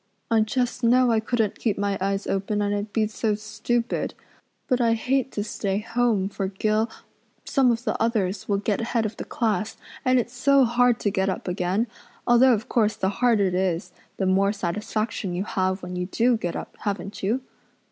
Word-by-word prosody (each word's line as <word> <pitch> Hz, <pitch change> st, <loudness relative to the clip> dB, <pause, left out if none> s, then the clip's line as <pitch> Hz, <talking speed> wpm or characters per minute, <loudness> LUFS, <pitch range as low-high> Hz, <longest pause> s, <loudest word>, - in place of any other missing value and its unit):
I 225 Hz, -, +5 dB
just 245 Hz, +3 st, -1 dB
know 245 Hz, +1 st, +5 dB
I 225 Hz, -, +3 dB
couldn't 220 Hz, -2 st, -1 dB
keep 220 Hz, -4 st, 0 dB
my 200 Hz, 0 st, 0 dB
eyes 195 Hz, +1 st, -1 dB
open 195 Hz, +2 st, -1 dB
and 205 Hz, 0 st, 0 dB
I'd 205 Hz, +1 st, -3 dB
be 220 Hz, 0 st, +2 dB
so 215 Hz, 0 st, -1 dB
stupid. 220 Hz, +3 st, -2 dB, 0.5 s
But 255 Hz, -2 st, +2 dB
I 230 Hz, -1 st, +4 dB
hate 260 Hz, +3 st, 0 dB
to 205 Hz, -, -1 dB
stay 200 Hz, -2 st, -2 dB
home, 225 Hz, -2 st, +1 dB
for 195 Hz, -1 st, -3 dB
Gil 215 Hz, +3 st, 0 dB, 0.6 s
some 265 Hz, -3 st, +3 dB
of 230 Hz, +1 st, -2 dB
the 215 Hz, -, -2 dB
others 210 Hz, -5 st, 0 dB
will 200 Hz, -, +2 dB
get 205 Hz, +1 st, -1 dB
head 230 Hz, 0 st, 0 dB
of 215 Hz, -, -4 dB
the -, -, -4 dB
class, 215 Hz, -3 st, -1 dB, 0.3 s
and 255 Hz, 0 st, +4 dB
it's 240 Hz, 0 st, -3 dB
so 275 Hz, +1 st, +4 dB
hard 240 Hz, 0 st, +3 dB
to 205 Hz, -, +1 dB
get 190 Hz, -1 st, +1 dB
up 190 Hz, -, -4 dB
again 180 Hz, +4 st, 0 dB, 0.4 s
although 245 Hz, +1 st, +6 dB
of 225 Hz, 0 st, -2 dB
course 215 Hz, -3 st, +2 dB
the 190 Hz, -, 0 dB
harder 220 Hz, 0 st, +2 dB
it 185 Hz, -, 0 dB
is 180 Hz, -1 st, -1 dB, 0.3 s
the 190 Hz, -, 0 dB
more 195 Hz, +2 st, +3 dB
satisfaction 205 Hz, 0 st, -2 dB
you 180 Hz, -, -1 dB
have 190 Hz, -1 st, -1 dB
when 180 Hz, 0 st, -5 dB
you 180 Hz, 0 st, -2 dB
do 235 Hz, +5 st, +2 dB
get 175 Hz, -6 st, -3 dB
up, -, -, -7 dB
haven't 200 Hz, 0 st, -4 dB
you?" 225 Hz, +7 st, 0 dB
215 Hz, 200 wpm, -25 LUFS, 195-235 Hz, 0.6 s, although